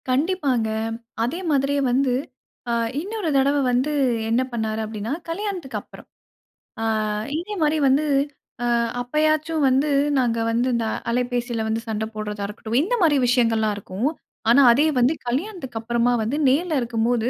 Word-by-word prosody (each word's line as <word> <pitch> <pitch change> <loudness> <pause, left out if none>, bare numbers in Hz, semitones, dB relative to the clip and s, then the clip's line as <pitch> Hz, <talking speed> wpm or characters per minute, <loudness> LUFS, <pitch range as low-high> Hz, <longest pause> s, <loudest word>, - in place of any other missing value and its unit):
கண்டிப்பாங்க. 270 -5 +1 0.5
அதே 255 +10 -2
மாதிரியே 280 0 +1
வந்து 260 +1 +2 0.6
அ - - +1 0.3
இன்னொரு 400 0 -3
தடவ 275 +2 +3
வந்து, 255 +5 +1 0.4
என்ன 230 +3 +2
பண்ணாரு? 220 -2 -2
அப்டின்னா, 215 +1 -5 0.2
கல்யாணத்துக்கு 350 - -3
அப்புறம். - - -15 0.7
அ - - -1 0.5
இதே 365 +6 -5
மாரி 305 0 +2
வந்து 270 +3 +4 0.6
அ - - 0 0.4
அப்பயாச்சும் 310 +4 +1
வந்து, 265 +3 +2 0.3
நாங்க 240 -3 +1
வந்து 235 +2 +1
இந்த 230 -1 0 0.2
அலைபேசியில 240 -1 -1
வந்து 220 +1 -1
சண்ட 220 -1 -2
போட்றதா 210 -1 -4
இருக்கட்டும், 220 +2 -3
இந்த 375 +11 -1
மாரி 310 -4 +4
விஷயங்கள்லாம் 230 -3 +2
இருக்கும். 200 +5 -3 0.4
ஆனா, 265 +4 +7
அதே 280 +6 +4
வந்து 250 +5 +4
கல்யாணத்துக்கு 265 - -3
அப்புறமா 235 +1 +1
வந்து 240 +7 -1
நேர்ல 310 +2 +1
இருக்கும்போது, 235 0 0
250 Hz, 140 wpm, -23 LUFS, 230-300 Hz, 0.7 s, ஆனா